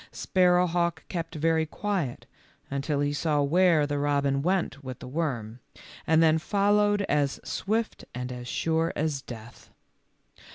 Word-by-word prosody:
Sparrowhawk 175 Hz, -2 st, +2 dB
kept 165 Hz, -2 st, -4 dB
very 160 Hz, +1 st, +1 dB
quiet 180 Hz, -8 st, -3 dB, 0.5 s
until 140 Hz, +1 st, -1 dB
he 145 Hz, 0 st, 0 dB
saw 145 Hz, 0 st, +1 dB
where 165 Hz, 0 st, +4 dB
the 145 Hz, 0 st, -2 dB
robin 140 Hz, -1 st, +1 dB
went 175 Hz, -4 st, -1 dB
with 130 Hz, -2 st, -6 dB
the -, -, -10 dB
worm, 125 Hz, -6 st, -3 dB, 0.5 s
and 160 Hz, +1 st, +5 dB
then 160 Hz, 0 st, +4 dB
followed 205 Hz, +3 st, +2 dB
as 145 Hz, -6 st, 0 dB
swift 220 Hz, +3 st, -2 dB
and 125 Hz, 0 st, -4 dB
as 125 Hz, -1 st, -7 dB
sure 165 Hz, +5 st, 0 dB
as 150 Hz, -2 st, -1 dB
death. 115 Hz, -1 st, -11 dB
155 Hz, 135 wpm, -27 LUFS, 140-175 Hz, 0.5 s, and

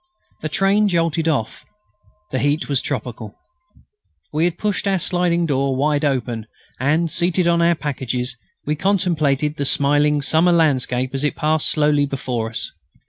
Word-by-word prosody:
The 155 Hz, -, -3 dB
train 195 Hz, +5 st, +2 dB
jolted 165 Hz, -3 st, 0 dB
off. 135 Hz, -9 st, -1 dB, 0.7 s
The 130 Hz, -, -1 dB
heat 145 Hz, +3 st, 0 dB
was 140 Hz, -3 st, 0 dB
tropical. 120 Hz, -6 st, -5 dB, 1.0 s
We 155 Hz, +3 st, +2 dB
had 175 Hz, 0 st, -1 dB
pushed 205 Hz, -1 st, -1 dB
our 195 Hz, -1 st, +2 dB
sliding 175 Hz, -1 st, +1 dB
door 135 Hz, -3 st, 0 dB
wide 145 Hz, +2 st, +1 dB
open, 120 Hz, -6 st, -1 dB, 0.3 s
and, 155 Hz, +5 st, +1 dB
seated 175 Hz, 0 st, +1 dB
on 170 Hz, 0 st, +3 dB
our 170 Hz, 0 st, +3 dB
packages, 130 Hz, -4 st, -3 dB, 0.3 s
we 150 Hz, -, 0 dB
contemplated 155 Hz, -6 st, 0 dB
the 140 Hz, -, -1 dB
smiling 145 Hz, +1 st, +2 dB
summer 165 Hz, +4 st, +3 dB
landscape 130 Hz, -5 st, +1 dB
as 135 Hz, +1 st, -2 dB
it 150 Hz, -, 0 dB
passed 155 Hz, -1 st, +1 dB
slowly 150 Hz, -2 st, +2 dB
before 125 Hz, -4 st, -3 dB
us. 115 Hz, -, -5 dB
150 Hz, 150 wpm, -20 LUFS, 135-170 Hz, 1.0 s, on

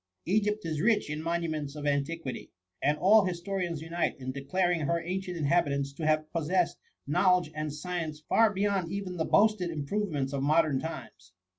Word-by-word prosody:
Egypt 210 Hz, +2 st, +1 dB
is 155 Hz, -2 st, -2 dB
rich 210 Hz, -6 st, +2 dB
in 150 Hz, +1 st, -3 dB
monuments 160 Hz, -3 st, -2 dB
6f 145 Hz, -1 st, -4 dB
antiquity; 145 Hz, 0 st, -2 dB, 0.3 s
and 150 Hz, +2 st, +2 dB
all 205 Hz, +5 st, +6 dB
historians 175 Hz, -3 st, -3 dB
unite 170 Hz, +1 st, -1 dB
in 130 Hz, -1 st, -5 dB
declar 140 Hz, +7 st, 0 dB
ing 175 Hz, -, +1 dB
her 170 Hz, +3 st, +1 dB
ancient 180 Hz, +1 st, -4 dB
inhabitants 140 Hz, -3 st, +1 dB
to 155 Hz, +2 st, -3 dB
have 155 Hz, 0 st, +2 dB
possessed 170 Hz, +2 st, 0 dB, 0.3 s
knowledge 180 Hz, +2 st, +3 dB
and 155 Hz, 0 st, -3 dB
science 155 Hz, 0 st, -4 dB
far 225 Hz, -1 st, +4 dB
beyond 195 Hz, -3 st, 0 dB
even 190 Hz, -2 st, -4 dB
the 160 Hz, -, 0 dB
boasted 210 Hz, -4 st, +3 dB
improvements 150 Hz, -3 st, -2 dB
of 140 Hz, -, -1 dB
modem 150 Hz, -1 st, +3 dB
times. 95 Hz, -, -8 dB
165 Hz, 165 wpm, -29 LUFS, 150-185 Hz, 0.3 s, all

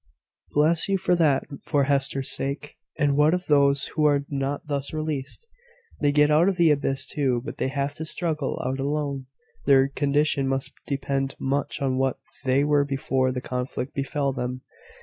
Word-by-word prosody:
"Bless 160 Hz, +5 st, +3 dB
you 195 Hz, -, +3 dB
for 180 Hz, -, +1 dB
that, 150 Hz, -5 st, +3 dB, 0.2 s
for 145 Hz, -3 st, +1 dB
Hester's 135 Hz, -1 st, +1 dB
sake! 140 Hz, +2 st, -3 dB, 0.2 s
And 145 Hz, -1 st, +2 dB
what 150 Hz, +4 st, +4 dB
of 180 Hz, 0 st, -4 dB
those 140 Hz, -1 st, +3 dB
who 155 Hz, -, -1 dB
are 145 Hz, -1 st, +3 dB
not 140 Hz, 0 st, -2 dB
thus 140 Hz, 0 st, -3 dB
released?" 155 Hz, -, -4 dB, 0.5 s
"They 145 Hz, -1 st, +2 dB
get 150 Hz, +1 st, +4 dB
out 160 Hz, +5 st, +5 dB
of 190 Hz, -, -2 dB
the 170 Hz, -3 st, +5 dB
abyss 135 Hz, -2 st, 0 dB
too; 135 Hz, -3 st, 0 dB
but 150 Hz, -, -6 dB
they -, -, +1 dB
have 140 Hz, +1 st, -2 dB
to 160 Hz, -, -4 dB
struggle 155 Hz, -3 st, -2 dB
out 130 Hz, +1 st, -2 dB
alone. 140 Hz, -1 st, -2 dB, 0.4 s
Their 135 Hz, -1 st, +5 dB
condition 145 Hz, 0 st, +1 dB
must 135 Hz, 0 st, -1 dB
depend 135 Hz, -1 st, -2 dB
much 140 Hz, +1 st, -2 dB
on 130 Hz, -1 st, 0 dB
what 135 Hz, -1 st, +1 dB, 0.3 s
they 130 Hz, +2 st, +3 dB
were 145 Hz, -1 st, +3 dB
before 135 Hz, -2 st, 0 dB
the 125 Hz, 0 st, -4 dB
conflict 125 Hz, +1 st, -4 dB
befell 140 Hz, 0 st, -1 dB
them. 125 Hz, 0 st, -4 dB
140 Hz, 175 wpm, -25 LUFS, 135-150 Hz, 0.5 s, out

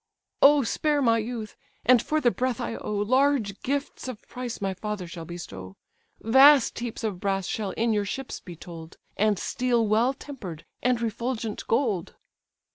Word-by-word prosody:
"O 285 Hz, 0 st, +7 dB
spare 295 Hz, +5 st, +1 dB
my 230 Hz, -4 st, +3 dB
youth, 220 Hz, -1 st, -5 dB, 0.3 s
and 250 Hz, -1 st, +6 dB
for 310 Hz, +4 st, 0 dB
the 245 Hz, -5 st, +3 dB
breath 255 Hz, 0 st, -1 dB
I 240 Hz, -, -3 dB
owe, 210 Hz, -, -4 dB
Large 245 Hz, -1 st, +2 dB
gifts 280 Hz, 0 st, -3 dB
of 250 Hz, -5 st, -8 dB
price 245 Hz, -2 st, -5 dB
my 195 Hz, -2 st, -1 dB
father 205 Hz, 0 st, -4 dB
shall 170 Hz, -1 st, -8 dB
bestow: 95 Hz, -, -8 dB, 0.4 s
Vast 265 Hz, +3 st, +6 dB
heaps 235 Hz, -1 st, -5 dB
of 205 Hz, -5 st, -2 dB
brass 195 Hz, -1 st, -1 dB
shall 210 Hz, +1 st, -2 dB
in 230 Hz, 0 st, +1 dB
your 205 Hz, -1 st, +1 dB
ships 265 Hz, +6 st, -5 dB
be 175 Hz, -3 st, -10 dB
told, 165 Hz, 0 st, -10 dB, 0.2 s
And 210 Hz, -1 st, +2 dB
steel 240 Hz, +2 st, 0 dB
well 230 Hz, +6 st, +2 dB
temper'd 205 Hz, -, -8 dB, 0.2 s
and 250 Hz, -1 st, +2 dB
refulgent 230 Hz, -1 st, -3 dB
gold." 225 Hz, -8 st, 0 dB
225 Hz, 165 wpm, -26 LUFS, 200-255 Hz, 0.4 s, O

